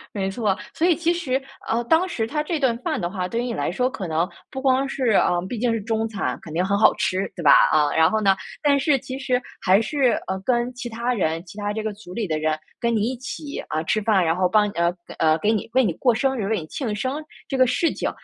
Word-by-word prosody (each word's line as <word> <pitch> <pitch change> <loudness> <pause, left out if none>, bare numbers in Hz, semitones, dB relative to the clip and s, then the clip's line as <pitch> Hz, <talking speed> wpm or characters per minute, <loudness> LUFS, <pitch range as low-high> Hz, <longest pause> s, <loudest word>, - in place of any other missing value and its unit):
没 195 -1 -1
错。 200 -2 0 0.2
所 335 +2 +1
以 340 - +4
其 340 0 +1
实， 275 -6 -1 0.3
呃， 235 +1 0
当 325 +8 +3
时 230 -11 -2
它 300 +7 -2
这 320 +2 -2
顿 260 -5 +1
饭 - - -2
的 175 - -2
话， 185 -2 -3
对 230 +4 -2
于 - - -2
你 245 -2 -3
来 - - -1
说 250 +9 0
可 195 -8 -5
能 165 +2 0 0.2
不 265 - -6
光 270 0 +2
是 265 -2 -2
呃， 175 -4 +3
毕 235 - -4
竟 240 -1 +1
是 225 - -2
中 225 +1 -1
餐， 210 -3 -3
肯 160 - -10
定 175 - +1
很 200 +2 +1
好 215 - +6
吃， 195 -2 -1
对 175 - -6
吧， 145 - +7 0.2
嗯。 150 -1 +3
然 160 0 +5
后 220 0 0
呢， 195 -1 +5 0.3
但 285 -1 +4
是 275 +1 +3
其 260 +2 -7
实 255 -2 0 0.2
还 195 +3 +4
是， 260 0 +2 0.2
呃， 190 0 -2
跟 245 0 +1
其 245 0 -6
他 235 +2 -2
人， 165 -6 -1
其 185 - -13
他 205 0 -2
这 220 0 -3
个 220 - -2
组 200 -3 -12
里 220 +2 -2
的 155 -1 0
人 155 0 0 0.2
跟 235 -1 +1
你 215 - +1
一 260 - -4
起， 280 +3 -6
啊， 155 +1 -2
吃 215 +6 0
饭， 205 -4 +3
然 165 - +2
后 185 - +3
帮 210 +2 +3
你 - - -8
呃， 170 +1 +1 0.2
呃， 155 0 +3
给 210 - +2
你 220 -1 -2
为 260 0 +4
你 195 - +1
过 245 +5 +2
生 265 +2 0
日， 200 - -2
为 215 -5 0
你 - - -8
庆 225 - -3
生 260 +7 -2 0.3
这 270 - -1
个 255 -1 +5
事 330 +7 +1
情， - - -2
225 Hz, 295 characters per minute, -23 LUFS, 190-260 Hz, 0.3 s, 吧